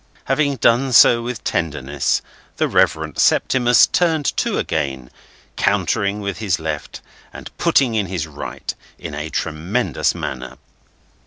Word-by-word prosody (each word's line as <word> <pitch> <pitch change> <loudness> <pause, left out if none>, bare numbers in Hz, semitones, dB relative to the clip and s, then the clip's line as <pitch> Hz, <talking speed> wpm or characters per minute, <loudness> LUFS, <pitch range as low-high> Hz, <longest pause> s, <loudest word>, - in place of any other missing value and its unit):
Having 145 -2 +1
done 125 +2 +2
so 115 0 +7
with 120 -2 -5
tenderness, 75 -4 -1 0.3
the - - +1
Reverend - - +1
Septimus 120 -2 +4
turned 160 -5 0
to - - 0
again, 65 -3 -3 0.5
countering 100 +1 0
with 100 0 -4
his 100 -5 0
left, 80 -2 -5 0.3
and - - -11
putting 130 -4 +3
in 105 -3 0
his 90 -3 -3
right, 75 -2 -6 0.2
in 80 - -8
a 75 +2 -5
tremendous 80 - -1
manner. 65 -1 -6
95 Hz, 130 wpm, -20 LUFS, 75-120 Hz, 0.5 s, so